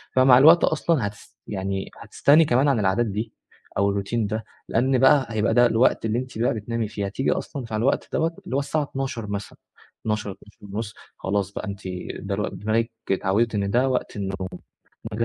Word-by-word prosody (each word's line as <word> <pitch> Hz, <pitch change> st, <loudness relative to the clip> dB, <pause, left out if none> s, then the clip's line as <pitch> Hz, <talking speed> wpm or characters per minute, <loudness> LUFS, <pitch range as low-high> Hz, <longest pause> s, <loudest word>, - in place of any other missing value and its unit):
فمع 130 Hz, -1 st, +7 dB
الوقت 160 Hz, +5 st, +7 dB
أصلًا 155 Hz, -7 st, +1 dB
هتس 105 Hz, -, -12 dB
يعني 95 Hz, -1 st, -3 dB
هتستغني 150 Hz, +3 st, +4 dB
كمان 130 Hz, +2 st, +3 dB
عن 135 Hz, -5 st, +3 dB
العادات 100 Hz, +4 st, +2 dB
دي، 110 Hz, +1 st, -4 dB, 0.4 s
أو 100 Hz, +1 st, +2 dB
الRoutine -, -, -11 dB, 0.2 s
ده، 110 Hz, +2 st, -3 dB, 0.2 s
لأن 130 Hz, +3 st, +2 dB
بقى 135 Hz, +1 st, +5 dB
هيبقى 110 Hz, 0 st, +1 dB
ده 120 Hz, +1 st, +6 dB
الوقت 115 Hz, 0 st, +3 dB
اللي 110 Hz, +2 st, 0 dB
أنتِ 130 Hz, -3 st, -7 dB
بقى 120 Hz, -, +2 dB
بتنامي 115 Hz, 0 st, -3 dB
فيه، 105 Hz, -1 st, -4 dB
هتيجي 100 Hz, +7 st, -1 dB
أصلًا 140 Hz, -5 st, -3 dB
مع 110 Hz, -, -1 dB
الوقت 125 Hz, +6 st, 0 dB
دوَّة 165 Hz, +1 st, 0 dB
اللي 130 Hz, -, -3 dB
هو 140 Hz, -, +3 dB
الساعة 145 Hz, +2 st, -1 dB
00:00 135 Hz, -5 st, -4 dB
مثلًا، 100 Hz, -1 st, -5 dB, 0.4 s
00:00-00:30 105 Hz, 0 st, -5 dB, 0.2 s
خلاص 100 Hz, 0 st, -1 dB
بقى، -, -, -5 dB
أنتِ 100 Hz, -1 st, -6 dB, 0.4 s
ده 100 Hz, 0 st, -3 dB
الو 105 Hz, -, -1 dB
دماغك 110 Hz, +4 st, -1 dB, 0.2 s
اتعوِّدت 105 Hz, +4 st, +1 dB
إن 100 Hz, -1 st, 0 dB
ده 130 Hz, +4 st, +3 dB
وقت 130 Hz, -, -2 dB
النوم 95 Hz, -2 st, -3 dB, 0.7 s
إنه 115 Hz, +2 st, 0 dB
110 Hz, 180 wpm, -24 LUFS, 100-130 Hz, 0.7 s, فمع